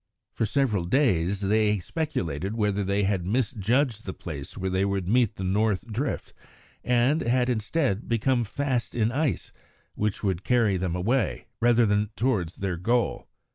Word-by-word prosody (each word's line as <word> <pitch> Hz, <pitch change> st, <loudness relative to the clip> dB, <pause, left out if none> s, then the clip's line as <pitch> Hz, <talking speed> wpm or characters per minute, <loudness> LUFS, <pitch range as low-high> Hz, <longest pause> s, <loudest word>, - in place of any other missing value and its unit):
For 115 Hz, -, 0 dB
several 105 Hz, -6 st, +1 dB
days 95 Hz, -, +2 dB
they 105 Hz, +1 st, +2 dB
speculated 95 Hz, -, -3 dB
whether 105 Hz, -2 st, 0 dB
they 100 Hz, +1 st, 0 dB
had 95 Hz, -2 st, 0 dB
misjudged 115 Hz, +3 st, 0 dB
the 95 Hz, -, -6 dB
place 75 Hz, -2 st, -7 dB
where 95 Hz, -1 st, -2 dB
they 95 Hz, +1 st, +1 dB
would 100 Hz, -2 st, -1 dB
meet 120 Hz, +1 st, +2 dB
the 95 Hz, -, -5 dB
north 100 Hz, +1 st, +1 dB
drift, 130 Hz, +7 st, -3 dB, 0.5 s
and 125 Hz, +6 st, +2 dB
had, 125 Hz, +1 st, +1 dB
instead, 115 Hz, -1 st, -1 dB
become 120 Hz, +2 st, +2 dB
fast 125 Hz, +2 st, -2 dB
in 115 Hz, -1 st, +1 dB
ice 135 Hz, -, -1 dB, 0.4 s
which 105 Hz, 0 st, -2 dB
would 95 Hz, -2 st, -1 dB
carry 115 Hz, -5 st, +3 dB
them 90 Hz, -1 st, -2 dB
away, 115 Hz, +7 st, 0 dB
rather 120 Hz, 0 st, +4 dB
than 105 Hz, 0 st, +1 dB
towards 105 Hz, -9 st, 0 dB
their 95 Hz, -3 st, -3 dB
goal. 115 Hz, +7 st, 0 dB
105 Hz, 155 wpm, -26 LUFS, 95-125 Hz, 0.5 s, rather